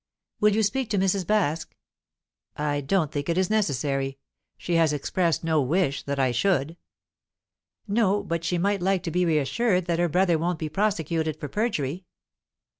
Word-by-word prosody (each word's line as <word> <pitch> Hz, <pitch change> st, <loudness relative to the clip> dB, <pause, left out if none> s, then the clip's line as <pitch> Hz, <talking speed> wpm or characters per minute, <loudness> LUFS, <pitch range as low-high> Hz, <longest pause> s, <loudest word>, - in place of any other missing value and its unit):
"Will 210 Hz, -1 st, +4 dB
you 220 Hz, -, +2 dB
speak 250 Hz, +4 st, 0 dB
to 210 Hz, -, 0 dB
Mrs. 190 Hz, 0 st, +1 dB
Baske?" 170 Hz, -7 st, 0 dB, 0.8 s
"I 145 Hz, -1 st, -1 dB
don't 155 Hz, +2 st, 0 dB
think 145 Hz, +1 st, -3 dB
it 170 Hz, -, +1 dB
is 185 Hz, +1 st, +1 dB
necessary. 135 Hz, -, 0 dB, 0.4 s
She 175 Hz, -, -4 dB
has 165 Hz, -2 st, +3 dB
expressed 165 Hz, +4 st, 0 dB
no 160 Hz, -2 st, +2 dB
wish 145 Hz, +1 st, 0 dB
that 140 Hz, 0 st, -4 dB
I 130 Hz, -2 st, +2 dB
should?" 155 Hz, +2 st, +1 dB, 1.1 s
"No; 205 Hz, -1 st, +2 dB
but 170 Hz, 0 st, -3 dB
she 175 Hz, +1 st, 0 dB
might 200 Hz, +2 st, 0 dB
like 190 Hz, 0 st, +1 dB
to 170 Hz, -, -3 dB
be 170 Hz, -2 st, +2 dB
assured 180 Hz, -, +1 dB
that 170 Hz, -1 st, -1 dB
her 175 Hz, 0 st, +2 dB
brother 175 Hz, 0 st, +2 dB
won't 175 Hz, +1 st, -1 dB
be 155 Hz, -1 st, -4 dB
prosecuted 160 Hz, -5 st, -1 dB
for 150 Hz, -, -5 dB
perjury." 180 Hz, -, -2 dB
170 Hz, 170 wpm, -25 LUFS, 150-195 Hz, 1.1 s, Will